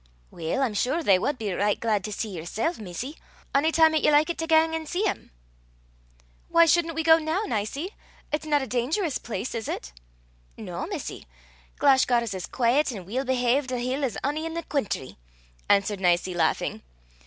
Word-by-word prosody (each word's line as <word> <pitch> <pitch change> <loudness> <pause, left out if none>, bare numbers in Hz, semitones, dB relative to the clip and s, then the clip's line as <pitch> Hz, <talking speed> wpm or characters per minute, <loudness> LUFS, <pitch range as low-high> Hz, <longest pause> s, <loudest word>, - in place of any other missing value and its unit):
"Weel, 170 +12 -2
I'm 240 -5 0
sure 265 +10 0
they 195 -9 +5
wad 285 +7 -1
be 210 -5 -3
richt 205 +3 +1
glaid 215 -4 +1
to 210 - -5
see 215 +2 -3
yersel', 220 - -3
missie, 215 - -6 0.4
ony 295 +4 +3
time 320 -1 +5
'at 310 - +2
ye - - +4
likit 305 +3 +3
to 325 - -2
gang 320 0 +4
an' 320 -1 -3
see 360 +6 -1
them." 415 - -2 1.2
"Why 335 0 +6
shouldn't 330 0 +2
we 325 - -1
go 320 0 +6
now, 320 +6 -1
Nicie? 275 - -2 0.4
It's 310 +1 -2
not 290 -2 +2
a - - -3
dangerous 265 - -1
place, 225 +1 -4
is 225 -2 -4
it?" 60 0 -5 0.6
"No, - - -5
missie. - - -6 0.5
Glashgar's 250 -5 +3
as 185 -2 -5
quaiet 260 +4 +2
an' 195 -6 -7
weel 255 +8 -2
behaved 255 +1 +1
a 250 - -1
hill 255 +4 -2
as 255 -5 -1
ony 305 +4 -1
in 325 - -6
a' - - -1
the - - -32
cweentry," 215 - -2 0.5
answered 200 0 +3
Nicie, 180 0 +2
laughing. 175 - 0
260 Hz, 190 wpm, -26 LUFS, 210-315 Hz, 1.2 s, Why